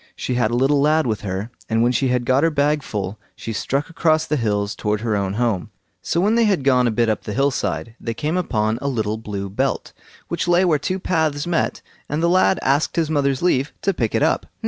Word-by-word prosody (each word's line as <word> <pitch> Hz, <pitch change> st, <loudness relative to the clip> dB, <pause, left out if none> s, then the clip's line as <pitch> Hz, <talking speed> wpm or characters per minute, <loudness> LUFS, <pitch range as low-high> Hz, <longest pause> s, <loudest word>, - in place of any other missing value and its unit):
She -, -, -3 dB
had 120 Hz, -3 st, +1 dB
a 120 Hz, -, -1 dB
little 135 Hz, +3 st, +3 dB
lad 155 Hz, +2 st, +3 dB
with 110 Hz, -4 st, -1 dB
her, 100 Hz, +3 st, -4 dB, 0.2 s
and 115 Hz, +1 st, +2 dB
when 120 Hz, -, +3 dB
she 130 Hz, +2 st, +1 dB
had 125 Hz, -1 st, 0 dB
got 130 Hz, +2 st, +3 dB
her 165 Hz, -, +4 dB
bag 150 Hz, 0 st, +1 dB
full, 105 Hz, -4 st, -4 dB, 0.2 s
she 115 Hz, -, -6 dB
struck 140 Hz, +7 st, -1 dB
across 160 Hz, -1 st, +1 dB
the 150 Hz, -, -1 dB
hills 105 Hz, -5 st, 0 dB
towards 105 Hz, +1 st, -2 dB
her 110 Hz, -3 st, 0 dB
own 100 Hz, -1 st, -1 dB
home. 110 Hz, -5 st, -1 dB, 0.3 s
So 170 Hz, -, -1 dB
when 205 Hz, +5 st, +3 dB
they 235 Hz, 0 st, +4 dB
had 195 Hz, -9 st, +1 dB
gone 125 Hz, -2 st, +4 dB
a -, -, +3 dB
bit 115 Hz, +1 st, +1 dB
up 110 Hz, -2 st, 0 dB
the 105 Hz, -, -5 dB
hill 140 Hz, +4 st, +2 dB
side, 80 Hz, -, -3 dB
they 115 Hz, -1 st, -4 dB
came 155 Hz, +5 st, -2 dB
upon 110 Hz, -10 st, 0 dB
a 140 Hz, -, -2 dB
little 110 Hz, -5 st, -1 dB
blue 100 Hz, -3 st, -5 dB
belt, 95 Hz, -, -2 dB, 0.3 s
which 170 Hz, +1 st, -2 dB
lay 175 Hz, +2 st, +4 dB
where 155 Hz, -4 st, +2 dB
two 185 Hz, +6 st, -2 dB
paths 160 Hz, -6 st, 0 dB
met, 175 Hz, -2 st, -1 dB, 0.3 s
and 150 Hz, +3 st, -1 dB
the 170 Hz, -, +3 dB
lad 185 Hz, +1 st, +4 dB
asked 140 Hz, +3 st, +1 dB
his 160 Hz, -2 st, 0 dB
mother's 140 Hz, -1 st, +1 dB
leave 145 Hz, -6 st, +1 dB
to 195 Hz, -, +2 dB
pick 115 Hz, -10 st, -1 dB
it -, -, +2 dB
up. -, -, +1 dB
130 Hz, 240 wpm, -21 LUFS, 110-155 Hz, 0.3 s, her